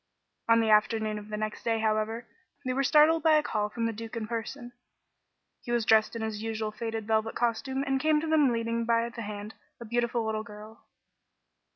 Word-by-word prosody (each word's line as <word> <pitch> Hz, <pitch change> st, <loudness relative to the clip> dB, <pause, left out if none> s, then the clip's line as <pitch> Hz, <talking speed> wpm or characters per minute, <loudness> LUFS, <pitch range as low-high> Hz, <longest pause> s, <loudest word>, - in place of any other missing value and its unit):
On 230 Hz, 0 st, +6 dB
the 220 Hz, -1 st, +2 dB
afternoon 215 Hz, 0 st, +2 dB
of 210 Hz, 0 st, -12 dB
the 210 Hz, -, -3 dB
next 215 Hz, 0 st, -4 dB
day, 225 Hz, -1 st, +1 dB
however, 220 Hz, +2 st, -1 dB, 0.4 s
they 255 Hz, -, 0 dB
were 270 Hz, -, +1 dB
startled 305 Hz, +4 st, +5 dB
by 315 Hz, 0 st, +4 dB
a 305 Hz, -1 st, +4 dB
call 210 Hz, -5 st, -1 dB
from 230 Hz, +2 st, -3 dB
the 230 Hz, -, -1 dB
Duke 225 Hz, +2 st, -8 dB
in 225 Hz, -2 st, -3 dB
person. 240 Hz, +2 st, -5 dB, 0.9 s
He 240 Hz, -, -6 dB
was 240 Hz, -2 st, +1 dB
dressed 220 Hz, +1 st, +4 dB
in 230 Hz, -, -3 dB
his 215 Hz, -1 st, -4 dB
usual 220 Hz, -1 st, -3 dB
faded 225 Hz, 0 st, -4 dB
velvet 220 Hz, 0 st, 0 dB
costume 240 Hz, +3 st, -1 dB
and 270 Hz, -1 st, 0 dB
came 310 Hz, 0 st, +3 dB
to 320 Hz, -, -4 dB
them 305 Hz, -5 st, +4 dB
leading 230 Hz, 0 st, -1 dB
by 230 Hz, 0 st, +2 dB
the 235 Hz, -, -8 dB
hand 210 Hz, 0 st, -6 dB, 0.3 s
a 235 Hz, -, -8 dB
beautiful 235 Hz, 0 st, 0 dB
little 220 Hz, 0 st, -1 dB
girl. 215 Hz, 0 st, -12 dB
230 Hz, 205 wpm, -28 LUFS, 215-240 Hz, 0.9 s, On